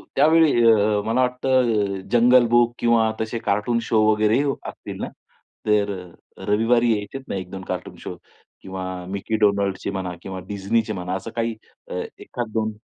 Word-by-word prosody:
त्यावेळी 155 -3 +5
अ, 105 -1 +3
मला 115 +3 +1
वाटतं 125 -5 +1
अ, - - -9
जंगल 120 +1 +6
बुक 120 0 +3
किंवा 115 -2 +3
तसे 110 +1 -3
कार्टून 105 +3 0
शो 110 -2 +4
वगैरे 110 +4 +3 0.3
असतील - - -9
ना? - - -2 0.6
तर 105 -1 +2 0.5
अ, - - -10
रविवारी 115 +3 +3
यायचेत 130 +6 -6
ना, - - -3
1-2 95 0 -6
कार्टून - - -5
शो - - -7 0.5
किंवा 95 0 -6 0.3
मिक्की 100 +3 -3
डोनाल्डचे 100 -2 +1
म्हणा 95 -2 -4
किंवा 95 0 -6
डिझनीचे 110 +2 -1
म्हणा 90 -1 -4
असं 95 +4 -6
काही 115 -1 -1 0.3
अ, - - -6 0.3
एखाद 120 -3 -5
2 110 -1 -1
110 Hz, 160 wpm, -23 LUFS, 100-120 Hz, 0.6 s, जंगल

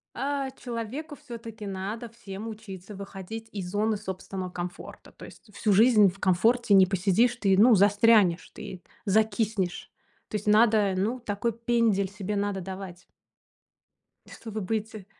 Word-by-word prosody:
а 275 0 -2
человеку 255 +5 -6
всё-таки 230 -4 -9
надо 200 +5 -5
всем 210 -2 -8
учиться 205 -3 -9
выходить 200 +3 -8
из 190 -3 -5
зоны 215 +2 0
собственного 190 -2 -6
комфорта. 175 +1 -8
То - - -12
есть 210 - -16
всю 210 -2 +1
жизнь 215 -1 +6
в 195 +2 -11
комфорте 215 +5 +2
не 190 -1 +7
посидишь, 195 +6 +2
ты, 195 -4 +2
ну, 230 +3 +7
застрянешь, 205 -3 +4
ты 190 -4 -9 0.2
закиснешь. 200 -3 0 0.4
То - - -5
есть 210 - -9
надо, 215 -2 +4
ну, 225 +7 -1
такой 230 +1 -2
пендель 230 -4 +1
себе 205 0 -4
надо 200 -1 -1
давать. 185 -1 -8 1.2
Чтобы 220 -2 -7
выйти, 215 0 -4
210 Hz, 140 wpm, -27 LUFS, 190-225 Hz, 1.2 s, не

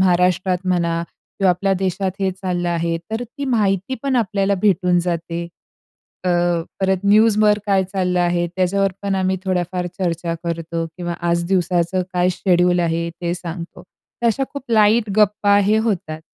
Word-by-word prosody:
महाराष्ट्रात 180 0 +2
म्हणा 170 -2 +1 0.4
किंवा 195 -2 +4
आपल्या 195 +2 +1
देशात 190 0 -1
हे 190 -1 +1
चाललं 180 -2 -3
आहे." 170 0 0
तर 225 +2 -2
ती 280 +4 -7
माहिती 210 -2 0
पण 270 -2 0
आपल्याला 200 -3 +1
भेटून 180 -3 +3
जाते. 170 -1 -3 0.8
अ, - - +1 0.5
परत 190 0 +1
न्यूजवर 210 0 +4
काय 195 -2 +3
चाललं 180 -1 -1
आहे, 175 0 +1
त्याच्यावर 195 +1 +1
पण 200 -1 -1
आम्ही 190 0 0
थोड्याफार 180 -1 -1
चर्चा 170 -2 -1
करतो 165 0 -3
किंवा 175 -1 -4 0.2
आज 170 0 +1
दिवसाचं 180 -1 +1
काय 180 0 +2
शेड्यूल 180 -1 +2
आहे, 170 0 0
ते 175 0 -1
सांगतो. 170 -1 -7 0.4
तर 235 - +3
अश्या 235 +4 +1
खूप 280 - -6
लाईट 215 0 +4
गप्पा 205 -1 +4
हे 215 +2 +3
होतात. 180 -8 -2
185 Hz, 155 wpm, -20 LUFS, 175-200 Hz, 0.8 s, किंवा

